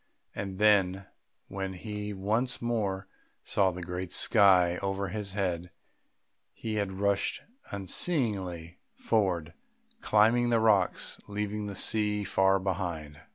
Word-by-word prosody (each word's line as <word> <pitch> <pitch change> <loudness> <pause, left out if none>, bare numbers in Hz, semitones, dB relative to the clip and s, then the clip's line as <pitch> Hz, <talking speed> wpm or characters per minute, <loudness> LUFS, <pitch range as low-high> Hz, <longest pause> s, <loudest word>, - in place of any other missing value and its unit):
And 95 -1 -5
then, 100 -2 +3 0.4
when 95 0 -4
he 105 +2 -5
once 110 +6 -1
more 105 -5 -2 0.4
saw 95 -2 +2
the 90 0 -6
great 90 +1 -5
sky 90 -5 +5
over 95 -1 -2
his 100 -1 -4
head, 90 -3 -2 0.8
he 110 - -5
had 100 -2 -1
rushed 100 +1 0 0.3
unseeingly 95 - -2 0.2
forward, 90 -7 0 0.5
climbing 115 +3 +3
the 115 -1 +3
rocks, 105 -4 +2
leaving 105 0 -3
the 100 - -6
sea 105 +1 +1
far 95 0 +3
behind. 85 -6 -4
100 Hz, 115 wpm, -29 LUFS, 95-105 Hz, 0.8 s, sky